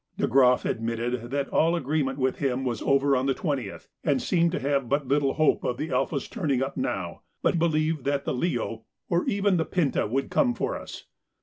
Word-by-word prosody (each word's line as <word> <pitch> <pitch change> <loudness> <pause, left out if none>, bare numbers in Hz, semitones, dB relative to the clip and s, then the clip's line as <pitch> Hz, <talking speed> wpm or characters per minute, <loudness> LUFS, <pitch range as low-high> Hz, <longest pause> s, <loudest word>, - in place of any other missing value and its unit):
De - - +1
Groff 125 -1 +4
admitted 115 +1 -2
that 140 +1 -1
all 165 +2 +3
agreement 140 -3 -1
with 130 -1 0
him 135 -2 0
was 120 -4 -2
over 140 0 +3
on 130 +1 0
the 135 - +1
20th, 140 - -3 0.2
and 145 -4 +2
seemed 170 +2 +2
to 180 - -2
have 140 -3 0
but 140 -1 0
little 140 0 +1
hope 155 -1 +2
of 120 - -1
the 155 - -4
'Alpha's' 140 -4 -1
turning 145 - -1
up 135 - -4
now, 90 -3 -3 0.2
but 170 - +2
believed 155 -3 +1
that 140 0 -1
the - - -1
'Leo,' 120 -6 -2 0.3
or 170 +1 +2
even 200 -2 +2
the 165 - +2
'Pinta,' 155 - 0
would 135 +5 -2
come 245 -4 +2
for - - -2
us. - - -8
140 Hz, 205 wpm, -26 LUFS, 125-160 Hz, 0.3 s, Groff